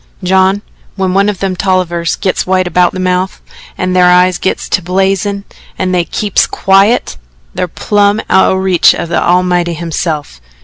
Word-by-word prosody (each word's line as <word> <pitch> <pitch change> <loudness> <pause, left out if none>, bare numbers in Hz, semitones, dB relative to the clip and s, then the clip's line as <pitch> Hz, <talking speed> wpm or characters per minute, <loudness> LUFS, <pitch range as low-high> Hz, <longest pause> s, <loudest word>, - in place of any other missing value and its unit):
"John, 190 +2 +2 0.3
when 190 -2 -1
one 200 +2 +2
o' - - 0
them 190 -1 -3
Tollivers 175 -3 -1
gits 185 - -2
white 185 0 +1
about 175 0 +1
the 185 - -5
mouth, 185 +1 -1 0.4
an' 185 0 -2
thar 180 -1 +4
eyes 180 0 +3
gits 190 - -2
to - - 0
blazin' 195 +2 -1 0.3
and 185 0 -1
they 175 -1 +1
KEEPS 205 +2 0
QUIET 195 - +1 0.4
they're 180 - -2
plumb 205 +4 0
out 190 - +4
o' - - +1
reach 190 -2 +3
o' - - -4
the 170 +1 -1
Almighty 175 -1 +1
hisself. 155 - -4
185 Hz, 170 wpm, -12 LUFS, 180-195 Hz, 0.4 s, thar